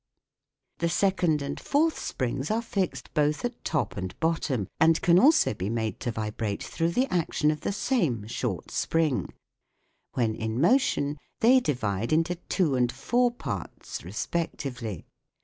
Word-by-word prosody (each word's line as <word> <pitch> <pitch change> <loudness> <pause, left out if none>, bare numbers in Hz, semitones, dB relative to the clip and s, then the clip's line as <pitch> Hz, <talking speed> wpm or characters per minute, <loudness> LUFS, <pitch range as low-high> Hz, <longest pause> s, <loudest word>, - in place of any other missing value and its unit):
The 170 - +1
second 175 -5 +2
and 140 - -4
fourth 315 +3 +1
springs 130 +2 -2
are 225 +2 0
fixed 195 -5 -3
both 150 +4 +1
at 240 0 -5
top 155 -3 -1
and 95 -2 -5
bottom, 155 - 0
and 160 0 +5
can 175 +1 +5
also 295 - +5
be 95 -1 -3
made 110 -3 -2
to - - -2
vibrate 110 -1 -3
through 165 0 -1
the 255 +7 +3
action 160 -3 +2
of 150 - -5
the - - -1
same 170 - 0
short 110 -4 -3
spring: 160 -4 0 0.8
when 115 -4 +1
in 110 +2 -3
motion 155 - +2 0.2
they 250 +3 +7
divide 115 - -1
into 165 +3 +2
two 175 -2 0
and 125 -1 +2
four 240 - +2
parts 125 - -6
respectively. 120 - -4
150 Hz, 150 wpm, -27 LUFS, 115-180 Hz, 0.8 s, they